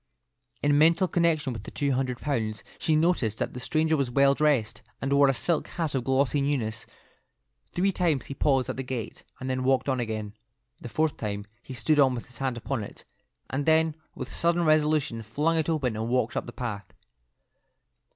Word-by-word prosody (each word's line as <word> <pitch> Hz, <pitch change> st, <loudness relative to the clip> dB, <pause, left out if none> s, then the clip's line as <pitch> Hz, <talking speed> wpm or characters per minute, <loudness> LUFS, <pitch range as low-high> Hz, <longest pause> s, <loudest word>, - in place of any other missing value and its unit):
In 145 Hz, 0 st, +4 dB
mental 170 Hz, +4 st, +5 dB
connection 165 Hz, -6 st, +1 dB
with 110 Hz, -, -6 dB
the -, -, -9 dB
two 140 Hz, -2 st, -1 dB
hundred 130 Hz, -1 st, -1 dB
pounds, 110 Hz, -7 st, -2 dB, 0.2 s
she 160 Hz, -, +2 dB
noticed 155 Hz, -, +2 dB
that -, -, -2 dB
the 125 Hz, -, -6 dB
stranger 155 Hz, +5 st, +1 dB
was 140 Hz, -4 st, 0 dB
well 140 Hz, +2 st, +4 dB
dressed, 140 Hz, -7 st, +1 dB, 0.2 s
and 135 Hz, +1 st, -1 dB
wore 140 Hz, 0 st, +6 dB
a 135 Hz, -, +3 dB
silk 165 Hz, +5 st, 0 dB
hat 165 Hz, -4 st, -3 dB
of 130 Hz, -3 st, 0 dB
glossy 135 Hz, +2 st, +2 dB
newness. 115 Hz, -6 st, -2 dB, 0.8 s
Three 195 Hz, +3 st, +1 dB
times 165 Hz, -7 st, 0 dB
he -, -, -6 dB
paused 135 Hz, -2 st, +2 dB
at -, -, -4 dB
the -, -, -2 dB
gate, 125 Hz, -3 st, -5 dB, 0.2 s
and 130 Hz, -, -5 dB
then 130 Hz, 0 st, -1 dB
walked 130 Hz, +1 st, +2 dB
on 130 Hz, -2 st, +1 dB
again. 110 Hz, -3 st, -3 dB, 0.5 s
The 120 Hz, -, -8 dB
fourth 155 Hz, +4 st, 0 dB
time 100 Hz, -2 st, -4 dB, 0.2 s
he 130 Hz, -, -9 dB
stood 135 Hz, +7 st, +2 dB
with 130 Hz, -4 st, +3 dB
his 125 Hz, -, -15 dB
hand 130 Hz, -3 st, -1 dB
upon 120 Hz, -1 st, -3 dB
it, -, -, -11 dB, 0.5 s
and 140 Hz, +2 st, -2 dB
then 160 Hz, 0 st, +4 dB, 0.2 s
with 130 Hz, -, -6 dB
sudden 170 Hz, 0 st, +1 dB
resolution 150 Hz, -5 st, +2 dB
flung 150 Hz, +10 st, 0 dB
it 160 Hz, -, -1 dB
open 135 Hz, -8 st, 0 dB
and 110 Hz, +2 st, -3 dB
walked 125 Hz, +1 st, +1 dB
up -, -, -2 dB
the -, -, -6 dB
path. 105 Hz, -6 st, -6 dB
135 Hz, 195 wpm, -27 LUFS, 120-155 Hz, 0.8 s, wore